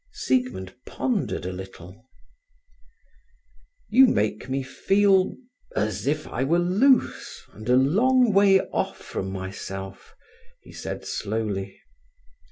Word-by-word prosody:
Siegmund 250 Hz, -, -1 dB
pondered 225 Hz, -, -2 dB
a 90 Hz, -, -3 dB
little…. 95 Hz, +4 st, -11 dB, 1.8 s
"You 265 Hz, +3 st, +6 dB
make 105 Hz, -, -1 dB
me 135 Hz, +1 st, -1 dB
feel—as 190 Hz, -, 0 dB
if 150 Hz, +1 st, 0 dB
I 130 Hz, -, -3 dB
were 160 Hz, +6 st, +2 dB
loose, 205 Hz, +10 st, +1 dB
and 110 Hz, +3 st, -9 dB
a 125 Hz, -, +5 dB
long 225 Hz, -, +3 dB
way 195 Hz, -1 st, +5 dB
off -, -, -3 dB
from 95 Hz, -, -5 dB
myself," 95 Hz, 0 st, -7 dB, 0.5 s
he -, -, -14 dB
said -, -, -6 dB
slowly. 100 Hz, -2 st, -3 dB
135 Hz, 105 wpm, -24 LUFS, -, 1.8 s, You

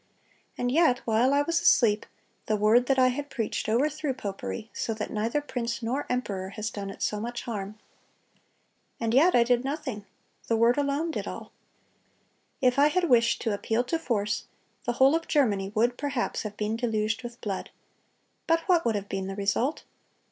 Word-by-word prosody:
And 245 Hz, 0 st, 0 dB
yet 310 Hz, -4 st, +4 dB
while 230 Hz, +3 st, +3 dB
I 285 Hz, +1 st, +3 dB
was 335 Hz, +3 st, 0 dB
asleep,... 215 Hz, -4 st, +4 dB, 0.4 s
the 215 Hz, -, +2 dB
word 220 Hz, +4 st, +4 dB
that 270 Hz, -, +2 dB
I 255 Hz, -1 st, +5 dB
had 285 Hz, +3 st, -4 dB
preached 225 Hz, -2 st, -3 dB
overthrew 285 Hz, +4 st, 0 dB
popery, 215 Hz, 0 st, -5 dB
so 225 Hz, -, -2 dB
that 215 Hz, -, -5 dB
neither 225 Hz, +7 st, -1 dB
prince 235 Hz, -4 st, -4 dB
nor 255 Hz, +5 st, -2 dB
emperor 200 Hz, -7 st, -2 dB
has 215 Hz, +1 st, -3 dB
done 200 Hz, -1 st, -5 dB
it 195 Hz, -, -6 dB
so 210 Hz, -, 0 dB
much 235 Hz, +2 st, -5 dB
harm. 210 Hz, -2 st, -5 dB, 1.2 s
And 230 Hz, -1 st, -1 dB
yet 320 Hz, +8 st, +5 dB
I 240 Hz, -, +6 dB
did 245 Hz, +1 st, +2 dB
nothing; 265 Hz, -8 st, -4 dB, 0.4 s
the 230 Hz, -, +2 dB
Word 230 Hz, +2 st, +4 dB
alone 290 Hz, +4 st, 0 dB
did -, -, -4 dB
all. -, -, -7 dB, 1.1 s
If 255 Hz, +1 st, +3 dB
I 290 Hz, -, +7 dB
had 345 Hz, +2 st, +1 dB
wished 235 Hz, -1 st, +3 dB
to 225 Hz, -, 0 dB
appeal 225 Hz, +3 st, 0 dB
to 325 Hz, +6 st, -2 dB
force, 210 Hz, -8 st, -1 dB, 0.4 s
the 240 Hz, -, 0 dB
whole 265 Hz, +4 st, +5 dB
of 330 Hz, 0 st, -1 dB
Germany 205 Hz, -10 st, +1 dB
would 240 Hz, +3 st, +1 dB
perhaps 280 Hz, -4 st, -2 dB
have 210 Hz, -1 st, -6 dB
been 215 Hz, +1 st, -1 dB
deluged 220 Hz, -1 st, -1 dB
with 240 Hz, 0 st, -8 dB
blood. 200 Hz, -6 st, -4 dB, 0.8 s
But 330 Hz, 0 st, +3 dB
what 345 Hz, -1 st, +2 dB
would 230 Hz, -2 st, +1 dB
have 200 Hz, -1 st, -3 dB
been 190 Hz, -1 st, -3 dB
the 195 Hz, -, -5 dB
result? 205 Hz, +8 st, 0 dB
240 Hz, 185 wpm, -27 LUFS, 215-275 Hz, 1.2 s, I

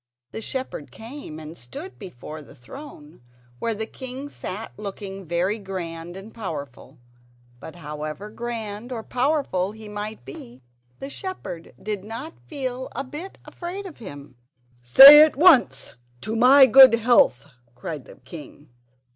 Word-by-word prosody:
The 220 Hz, -, -6 dB
shepherd 255 Hz, -, -5 dB
came 225 Hz, -, -10 dB
and 155 Hz, +1 st, -10 dB
stood 285 Hz, -, -9 dB
before 155 Hz, -, -9 dB
the 145 Hz, -, -16 dB
throne, 155 Hz, -, -13 dB, 0.4 s
where 230 Hz, -1 st, -1 dB
the 220 Hz, +1 st, -3 dB
king 260 Hz, +4 st, -8 dB
sat 215 Hz, -4 st, -7 dB
looking 195 Hz, -2 st, -7 dB
very 180 Hz, +6 st, -1 dB
grand 175 Hz, -3 st, -7 dB
and 205 Hz, +3 st, -11 dB
powerful. 145 Hz, -, -8 dB, 0.6 s
But 160 Hz, -, -10 dB
however 155 Hz, +4 st, -7 dB
grand 230 Hz, 0 st, -6 dB
or 230 Hz, -3 st, -5 dB
powerful 250 Hz, -9 st, -1 dB
he 220 Hz, -1 st, -11 dB
might 210 Hz, -, -7 dB
be 125 Hz, -1 st, -12 dB, 0.3 s
the 275 Hz, -, -8 dB
shepherd 195 Hz, -, -7 dB
did 210 Hz, -2 st, -5 dB
not 230 Hz, +10 st, -7 dB
feel 260 Hz, -3 st, -5 dB
a 275 Hz, -, -3 dB
bit 305 Hz, +8 st, -9 dB
afraid 370 Hz, +3 st, -7 dB
of 365 Hz, -, -11 dB
him. 145 Hz, -, -11 dB, 0.4 s
"Say 275 Hz, -, +11 dB
at 310 Hz, 0 st, +5 dB
once, 315 Hz, -3 st, +4 dB, 0.3 s
'To 220 Hz, +7 st, -4 dB
my 260 Hz, +4 st, +7 dB
good 265 Hz, -2 st, +8 dB
health!'" 230 Hz, -, +3 dB, 0.3 s
cried 150 Hz, -2 st, -7 dB
the -, -, -14 dB
king. 145 Hz, +2 st, -13 dB
215 Hz, 140 wpm, -23 LUFS, 165-260 Hz, 0.6 s, Say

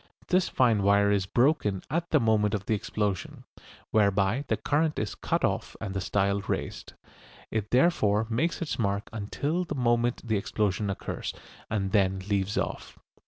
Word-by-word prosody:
This 185 Hz, -1 st, +3 dB
fine 115 Hz, -5 st, +3 dB
wire 100 Hz, +1 st, +4 dB
is 100 Hz, -2 st, +1 dB
broken 120 Hz, -, +2 dB
at 170 Hz, +2 st, -1 dB
the 155 Hz, -, +4 dB
moment 110 Hz, -3 st, +2 dB
of 100 Hz, -1 st, -4 dB
the 110 Hz, -, 0 dB
explosion, 100 Hz, -2 st, -2 dB, 0.5 s
whereby 100 Hz, +5 st, +2 dB
the -, -, +1 dB
current 155 Hz, +1 st, 0 dB
is 105 Hz, -4 st, -2 dB
cut -, -, 0 dB
off -, -, -2 dB
and 100 Hz, -4 st, -4 dB
the 95 Hz, -, -2 dB
style 100 Hz, +1 st, +1 dB
raised. -, -, -4 dB, 0.6 s
It 110 Hz, -1 st, -2 dB
therefore 110 Hz, -7 st, +3 dB
makes 150 Hz, +10 st, 0 dB
its 150 Hz, -, -4 dB
mark 100 Hz, -1 st, -1 dB
until 145 Hz, -, -2 dB
the 170 Hz, -, -5 dB
moment 120 Hz, -1 st, +1 dB
the 110 Hz, -2 st, +2 dB
explosion 100 Hz, 0 st, -1 dB
occurs, 100 Hz, -, -4 dB, 0.3 s
and 100 Hz, -3 st, -1 dB
then 95 Hz, -2 st, +3 dB
leaves 100 Hz, -1 st, 0 dB
off. -, -, -3 dB
105 Hz, 165 wpm, -28 LUFS, 100-125 Hz, 0.6 s, wire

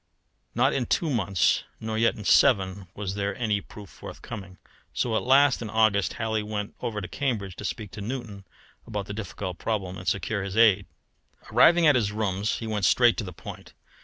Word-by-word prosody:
Not 130 Hz, +4 st, +3 dB
in 125 Hz, -3 st, -1 dB
two 165 Hz, -3 st, +1 dB
months, 100 Hz, -7 st, +2 dB, 0.2 s
nor 110 Hz, 0 st, -4 dB
yet 115 Hz, +1 st, +2 dB
in 105 Hz, -, -9 dB
seven, 95 Hz, -8 st, +3 dB
was 100 Hz, -2 st, -4 dB
there 100 Hz, 0 st, -2 dB
any 105 Hz, -3 st, 0 dB
proof 105 Hz, 0 st, -12 dB
forthcoming. 95 Hz, +1 st, -9 dB, 0.4 s
So 115 Hz, -3 st, 0 dB
at -, -, +1 dB
last, 135 Hz, +1 st, +4 dB
in 115 Hz, -, -5 dB
August, 110 Hz, -2 st, +2 dB
Halley 110 Hz, -1 st, -1 dB
went 105 Hz, -1 st, -4 dB
over 105 Hz, -3 st, -3 dB
to 90 Hz, -, -5 dB
Cambridge 105 Hz, -10 st, -3 dB
to 105 Hz, -, -7 dB
speak 105 Hz, -3 st, -5 dB
to 105 Hz, -, -8 dB
Newton 110 Hz, -3 st, -6 dB, 0.4 s
about 105 Hz, -3 st, -4 dB
the 100 Hz, -, -6 dB
difficult 100 Hz, -3 st, -6 dB
problem 95 Hz, -5 st, -3 dB
and 90 Hz, -, -10 dB
secure 100 Hz, +3 st, -1 dB
his 100 Hz, +2 st, -5 dB
aid. 105 Hz, -4 st, +5 dB, 0.6 s
Arriving 170 Hz, 0 st, +6 dB
at 150 Hz, -, +7 dB
his 110 Hz, -6 st, +1 dB
rooms 105 Hz, -1 st, -1 dB
he 115 Hz, -, -6 dB
went 105 Hz, -3 st, -1 dB
straight 120 Hz, +3 st, +5 dB
to 115 Hz, -, -2 dB
the 90 Hz, -, -7 dB
point. 80 Hz, -, -10 dB
105 Hz, 190 wpm, -26 LUFS, 100-115 Hz, 0.6 s, at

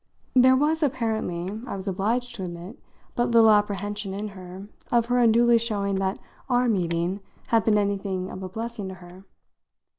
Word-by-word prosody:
There 260 Hz, 0 st, +6 dB
was 305 Hz, +4 st, +1 dB
apparently, 220 Hz, -, -2 dB
I -, -, -4 dB
was 195 Hz, 0 st, -7 dB
obliged 225 Hz, +6 st, -1 dB
to 205 Hz, -5 st, -5 dB
admit, 175 Hz, +4 st, -8 dB, 0.4 s
but 240 Hz, -, +1 dB
little 230 Hz, -2 st, +6 dB
apprehension 205 Hz, -1 st, 0 dB
in 210 Hz, +1 st, -4 dB
her 185 Hz, 0 st, -10 dB, 0.2 s
of 235 Hz, -1 st, +3 dB
her 245 Hz, 0 st, +3 dB
unduly 235 Hz, 0 st, +5 dB
showing 200 Hz, -4 st, -1 dB
that 190 Hz, 0 st, -1 dB, 0.3 s
our 245 Hz, 0 st, +2 dB
meeting 175 Hz, -2 st, 0 dB, 0.3 s
had 225 Hz, -2 st, +3 dB
been 215 Hz, -2 st, +4 dB
anything 195 Hz, -2 st, -2 dB
of 185 Hz, -, -7 dB
a 185 Hz, -, -5 dB
blessing 225 Hz, 0 st, -5 dB
to 190 Hz, -, -7 dB
her. 180 Hz, +1 st, -14 dB
205 Hz, 170 wpm, -25 LUFS, 190-235 Hz, 0.4 s, There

